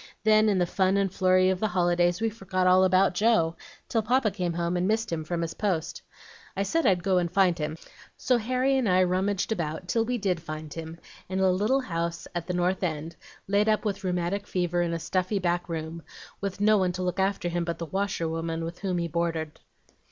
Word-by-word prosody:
Then, 215 0 +5
in 200 - +2
the 180 - +2
fun 190 +2 +1
and 195 -2 0
flurry 185 0 +3
of 185 - -2
the 215 - +1
holidays, 175 -1 +1
we 225 -1 +1
forgot 190 -3 -2
all 185 +1 +6
about 185 0 +4
Joe, 180 -5 +2 0.3
till 225 - +1
Papa 235 0 +2
came 180 -3 -2
home 170 +1 -1
and 180 +1 +1
missed 220 -1 0
him 160 -1 -2
from 170 +1 -2
his 165 -1 -4
post. 180 -6 -2 0.6
I 195 - +1
said 330 +11 +1
I'd 180 -3 +2
go 190 -1 +3
and 175 -1 -1
find 185 -2 +3
him; 155 +1 -3 0.4
so 250 -1 +2
Harry 255 +4 +1
and 235 -6 0
I 185 0 +4
rummaged 190 +3 0
about 170 -3 -3
till 225 +4 +1
we 245 +2 -1
did 190 -6 -1
find 155 -1 -7
him, 165 0 -7 0.3
in 190 0 -2
a 190 -1 +4
little 215 +9 +1
house 170 -6 -3
at 175 -1 -4
the 180 - -2
North 180 +1 0
End, 160 -2 -3 0.3
laid 205 +2 +2
up 215 +1 +1
with 200 0 -2
rheumatic 180 +2 -1
fever 175 -1 0
in 170 -1 0
a 170 - -1
stuffy 185 +4 -1
back 175 -1 -1
room, 165 0 -5 0.4
with 200 -1 -4
no 210 0 +4
one 180 -1 +1
to 185 +1 -3
look 180 +1 -2
after 190 -2 0
him 175 0 -1
but 170 0 -3
the 170 - -4
washerwoman 165 -3 -2
with 170 +1 -7
whom 190 -2 -1
he 170 -1 -1
boarded. 165 -1 -2
185 Hz, 220 wpm, -27 LUFS, 170-200 Hz, 0.6 s, all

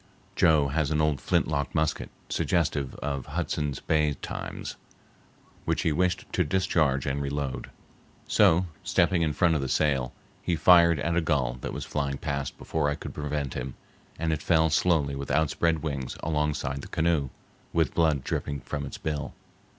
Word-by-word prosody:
Joe 75 -4 +4
has 75 0 0
an 75 - +1
old 75 -3 +1
flintlock 70 -3 0
musket 80 0 0 0.2
suggestive 75 -6 0
of 70 -3 -4
Hudson's 75 -3 -2
Bay 75 -2 +1
times, - - -6 0.9
which - - 0
he - - +2
wished 90 +3 +1
to 90 - +3
discharge 80 -5 +1
and 70 +1 -1
reload. 70 -1 -3 0.6
So, 95 -3 +4 0.2
stepping 90 -1 +2
in 80 -2 +2
front 85 +3 +3
of 75 - +1
the 65 - -3
sail, 65 -5 +1 0.3
he 85 - 0
fired 85 0 +6
at 85 +4 0
a 85 - +3
gull 65 -6 0
that - - -4
was - - -5
flying 70 -2 -2
past 70 -1 -3
before 75 -2 -1
I 75 - -1
could - - -8
prevent 75 -2 -3
him, 65 +1 -5 0.4
and 80 +1 0
it 75 - -3
fell 80 -1 +3
slowly 75 -4 +2
with 70 0 -5
outspread 80 +3 +1
wings 70 -5 -3
alongside 75 -3 -1
the - - -9
canoe, 80 -4 +1 0.4
with 80 -5 +1
blood 80 -5 +2
dripping 70 -2 -3
from 70 +1 -4
its - - -7
bill. 75 -2 -4
75 Hz, 165 wpm, -27 LUFS, 70-80 Hz, 0.9 s, fired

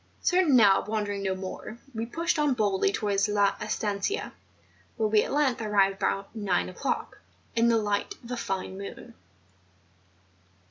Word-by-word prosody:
Certain 360 -6 +4
now 200 -5 +6
of - - -12
wandering 205 -2 -2
no 190 -1 -1
more, 190 +4 -7 0.2
we 225 0 -3
pushed 330 +5 -1
on 295 -3 +2
boldly 200 -4 +2
towards 200 0 +1
La 205 -1 +2
Estancia^ 215 - -2 0.7
where 220 - +2
we 210 0 +4
at - - -3
length 275 -5 +1
arrived 200 -2 +2
about 195 +1 -2
nine 200 -5 0
o'clock, 185 +9 -3 0.4
in 230 0 +4
the 230 -1 +4
light 210 - -1
of 235 - -10
a - - -1
fine 190 -4 -4
moon. 215 +4 -9
210 Hz, 155 wpm, -27 LUFS, 195-235 Hz, 0.7 s, now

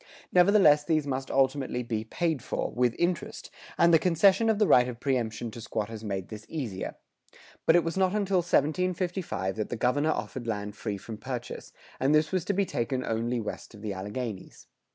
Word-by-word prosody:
[101:4] - - -25 0.3
Nevertheless 180 -5 +6
these 155 -1 +1
must 135 -1 -3
ultimately 135 -2 +1
be 110 -2 -2
paid 160 +4 -1
for, - - -3
with 120 -1 +1
interest, 175 -1 -2 0.3
and 170 0 +5
the 165 - +7
concession 190 +6 +4
of 220 - +2
the 210 - +4
right 125 -9 +5
of 120 -2 -6
preëmption 120 -4 -1
to 115 - -9
squatters 110 0 -4
made 95 -3 -4
this 110 -1 -8
easier. 115 -12 -4 0.7
But 160 - +6
it 175 - +5
was 165 +3 -3
not 190 +1 +2
until 200 -2 +1
1755 175 - 0
that 110 - -2
the - - -2
governor 145 +7 +1
offered 130 -5 -3
land 105 -2 -3
free 105 -2 -4
from 110 +2 -8
purchase, 125 0 -6 0.3
and 140 +3 +3
this 155 0 +2
was 185 -3 0
to 200 - 0
be 200 +1 +1
taken 125 -3 -2
only 115 +2 -1
west 110 +1 -6
of 105 - -13
the 105 -2 -3
Alleghanies. 105 +2 -6
130 Hz, 195 wpm, -28 LUFS, 115-170 Hz, 0.7 s, the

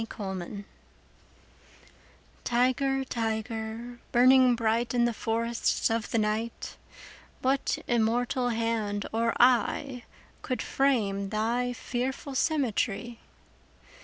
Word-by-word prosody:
The 225 - -4
Tiger 195 -1 -6 1.8
TIGER, 260 +3 +1
tiger, 225 0 -4
burning 255 0 +6
bright 230 +1 0
In 240 -1 +4
the 240 - 0
forests 230 +1 0
of 225 -1 -1
the - - 0
night, 220 +2 -2 0.7
What 265 +1 +1
immortal 245 +2 +1
hand 225 -3 -1
or 230 +1 +1
eye 250 +1 +2 0.4
Could 255 - -3
frame 205 -8 +1
thy 235 +4 0
fearful 260 +3 -4
symmetry? 245 -6 -1
235 Hz, 95 wpm, -28 LUFS, 220-250 Hz, 1.8 s, burning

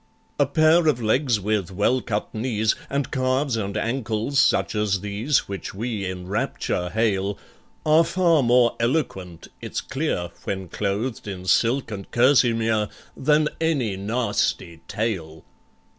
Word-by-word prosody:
"A 145 - +4
pair 160 +3 +4
of 145 -6 +3
legs 120 +1 +1
with 100 -2 -1
well 105 +7 +1
cut 105 -2 -3
knees, 110 -1 0 0.2
And 140 -2 -2
calves 130 0 0
and 100 -2 -3
ankles 115 +2 -1
such - - +3
as 105 -3 0
these 105 +8 0
Which 100 -1 -6
we 110 -2 -3
in 90 -1 -6
rapture 90 -2 -2
hail, 100 -2 0 0.5
Are 155 +2 +5
far 170 -2 +3
more 120 -1 +4
eloquent, 115 - -2
it's - - -4
clear 135 - -2
(When 95 -2 -4
clothed 105 +6 -3
in 95 -2 -6
silk 115 +8 +2
and 100 -2 -7
kerseymere), 115 -4 +3 0.3
Than 150 +2 +2
any 140 -11 0
nasty 100 -5 -1
tail." 85 -8 -3
110 Hz, 135 wpm, -23 LUFS, 100-130 Hz, 0.5 s, Are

